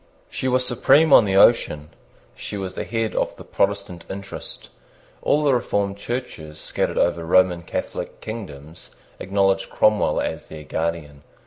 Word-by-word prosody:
She 130 Hz, -, -3 dB
was 130 Hz, 0 st, +2 dB
supreme 140 Hz, +5 st, +4 dB
on 110 Hz, -, +8 dB
the 95 Hz, -1 st, 0 dB
ocean. 75 Hz, -8 st, +4 dB, 0.4 s
She 105 Hz, -, -6 dB
was 95 Hz, -2 st, -5 dB
the -, -, -5 dB
head 115 Hz, -1 st, -2 dB
of -, -, -1 dB
the -, -, -11 dB
Protestant 100 Hz, -4 st, -2 dB
interest. 100 Hz, 0 st, -7 dB, 0.5 s
All 150 Hz, -, +2 dB
the 140 Hz, -2 st, +3 dB
reformed 100 Hz, -4 st, -1 dB
Churches 100 Hz, -10 st, -6 dB
scattered -, -, -2 dB
over 85 Hz, -1 st, +1 dB
Roman 90 Hz, +1 st, +3 dB
Catholic 85 Hz, -, -5 dB
kingdoms 80 Hz, -9 st, -9 dB, 0.3 s
acknowledged 95 Hz, 0 st, +1 dB
Cromwell 105 Hz, -1 st, +2 dB
as -, -, -4 dB
their 75 Hz, -1 st, -9 dB
guardian. 80 Hz, -2 st, -4 dB
100 Hz, 145 wpm, -22 LUFS, 85-115 Hz, 0.5 s, on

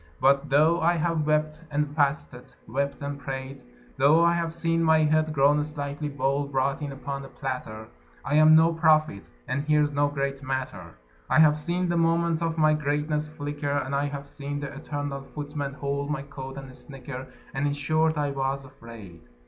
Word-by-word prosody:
But 140 Hz, +2 st, +3 dB
though 155 Hz, +5 st, +4 dB
I 170 Hz, +2 st, +3 dB
have 160 Hz, -2 st, 0 dB
wept 155 Hz, +1 st, 0 dB
and 150 Hz, 0 st, 0 dB
fasted, 140 Hz, -4 st, -1 dB
wept 140 Hz, +1 st, -2 dB
and 140 Hz, 0 st, -4 dB
prayed, 135 Hz, 0 st, -6 dB, 0.4 s
Though 150 Hz, +5 st, +5 dB
I 170 Hz, -, +4 dB
have 170 Hz, -1 st, -1 dB
seen 165 Hz, 0 st, 0 dB
my 160 Hz, -1 st, +4 dB
head 155 Hz, +1 st, +2 dB
[grown 145 Hz, 0 st, +3 dB
slightly 145 Hz, 0 st, -4 dB
bald] 140 Hz, 0 st, -1 dB
brought 135 Hz, +2 st, 0 dB
in 145 Hz, -1 st, -4 dB
upon 140 Hz, 0 st, -5 dB
a -, -, -9 dB
platter, 125 Hz, -6 st, -5 dB, 0.4 s
I 140 Hz, -, -2 dB
am 155 Hz, +1 st, +7 dB
no 165 Hz, +1 st, +5 dB
prophet 155 Hz, -, +2 dB, 0.2 s
and 140 Hz, -, -1 dB
here's 150 Hz, 0 st, +2 dB
no 145 Hz, 0 st, +2 dB
great 140 Hz, -1 st, -3 dB
matter; 130 Hz, -11 st, -4 dB, 0.3 s
I -, -, +3 dB
have 155 Hz, -1 st, +6 dB
seen 175 Hz, +3 st, -1 dB
the 175 Hz, 0 st, 0 dB
moment 165 Hz, 0 st, +2 dB
of 165 Hz, -1 st, -1 dB
my 155 Hz, -1 st, +4 dB
greatness 150 Hz, +1 st, -1 dB
flicker, 145 Hz, -1 st, -5 dB
And 140 Hz, -1 st, -1 dB
I 140 Hz, +1 st, +1 dB
have 140 Hz, -1 st, -5 dB
seen 145 Hz, 0 st, -5 dB
the 140 Hz, -1 st, -6 dB
eternal 145 Hz, -1 st, -4 dB
Footman 145 Hz, 0 st, -5 dB
hold 140 Hz, 0 st, -3 dB
my 145 Hz, -2 st, -2 dB
coat, 135 Hz, -1 st, -8 dB
and 135 Hz, -2 st, -9 dB
snicker, 130 Hz, 0 st, -8 dB, 0.3 s
And 135 Hz, +2 st, 0 dB
in 145 Hz, -, 0 dB
short, 155 Hz, +2 st, +1 dB
I 145 Hz, -1 st, 0 dB
was 135 Hz, 0 st, -2 dB
afraid. 115 Hz, -9 st, -12 dB
145 Hz, 185 wpm, -26 LUFS, 140-155 Hz, 0.4 s, am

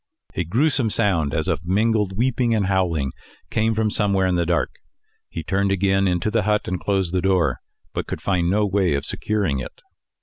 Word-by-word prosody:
A -, -, -1 dB
gruesome 120 Hz, -, +1 dB
sound 95 Hz, -10 st, +1 dB
as 80 Hz, +2 st, -1 dB
of 80 Hz, -2 st, -1 dB
mingled 105 Hz, +1 st, +1 dB
weeping 120 Hz, -1 st, +1 dB
and 105 Hz, -3 st, +1 dB
howling 85 Hz, -8 st, 0 dB, 0.4 s
came 110 Hz, 0 st, +1 dB
from 110 Hz, -1 st, +1 dB
somewhere 100 Hz, -3 st, +2 dB
in 90 Hz, -, +1 dB
the 85 Hz, -1 st, 0 dB
dark. 85 Hz, -1 st, +1 dB, 0.6 s
He 80 Hz, -, -5 dB
turned 100 Hz, +4 st, 0 dB
again 95 Hz, 0 st, +2 dB
into 90 Hz, +3 st, 0 dB
the 115 Hz, -, +2 dB
hut 105 Hz, +1 st, 0 dB
and 90 Hz, 0 st, -2 dB
closed 95 Hz, -3 st, -1 dB
the 90 Hz, -, +1 dB
door, 90 Hz, -9 st, +2 dB, 0.3 s
but -, -, -3 dB
could -, -, -4 dB
find 90 Hz, -3 st, 0 dB
no 105 Hz, +3 st, +2 dB
way 95 Hz, -5 st, +1 dB
of 70 Hz, -, -3 dB
securing 100 Hz, -11 st, -1 dB
it. 65 Hz, -, -8 dB
95 Hz, 195 wpm, -22 LUFS, 85-105 Hz, 0.6 s, somewhere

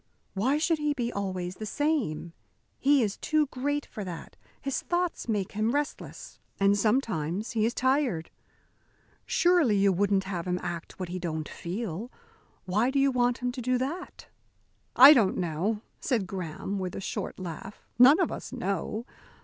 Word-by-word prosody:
"Why 250 Hz, +9 st, +1 dB
should 320 Hz, +1 st, +1 dB
he 295 Hz, -1 st, 0 dB
be 240 Hz, -3 st, -2 dB
always 185 Hz, -2 st, -3 dB
the 215 Hz, -, -5 dB
same? 245 Hz, -, -1 dB, 0.5 s
He 280 Hz, -1 st, +4 dB
is 205 Hz, -2 st, -2 dB
too 310 Hz, -1 st, +1 dB
great 290 Hz, +2 st, -2 dB
for 215 Hz, -, -7 dB
that. 175 Hz, -3 st, -8 dB, 0.2 s
His 275 Hz, -1 st, -2 dB
thoughts 350 Hz, -7 st, -2 dB
make 205 Hz, -4 st, -1 dB
him 215 Hz, +3 st, 0 dB
restless, 290 Hz, 0 st, -4 dB, 0.2 s
and 200 Hz, 0 st, +4 dB
sometimes 210 Hz, -, 0 dB
he 220 Hz, -1 st, +2 dB
is 235 Hz, -, -3 dB
tired. 260 Hz, -, +1 dB, 1.0 s
Surely 345 Hz, -, +3 dB
you 195 Hz, 0 st, +4 dB
wouldn't 195 Hz, +1 st, +2 dB
have 185 Hz, -2 st, -4 dB
him 180 Hz, 0 st, 0 dB
act 175 Hz, 0 st, -6 dB
what 185 Hz, -2 st, -4 dB
he 185 Hz, +1 st, -4 dB
don't 160 Hz, -3 st, -3 dB
feel. 200 Hz, +4 st, -5 dB, 0.5 s
Why 210 Hz, +7 st, +2 dB
do 270 Hz, -, -1 dB
you 275 Hz, 0 st, +4 dB
want 245 Hz, 0 st, +1 dB
him 250 Hz, -, +1 dB
to 250 Hz, 0 st, -6 dB
do 255 Hz, +1 st, +1 dB
that?" 295 Hz, +8 st, -5 dB, 0.7 s
"I 270 Hz, +4 st, +11 dB
don't 220 Hz, -9 st, +3 dB
know," 185 Hz, +5 st, -1 dB, 0.2 s
said 230 Hz, -7 st, 0 dB
Graham, 190 Hz, +2 st, -4 dB
with 185 Hz, -1 st, -4 dB
a -, -, -4 dB
short 195 Hz, -, -4 dB
laugh. 180 Hz, +2 st, -8 dB
"None 270 Hz, +7 st, +8 dB
of 360 Hz, -, +1 dB
us -, -, -6 dB
know. 220 Hz, -1 st, -3 dB
215 Hz, 165 wpm, -28 LUFS, 185-265 Hz, 1.0 s, I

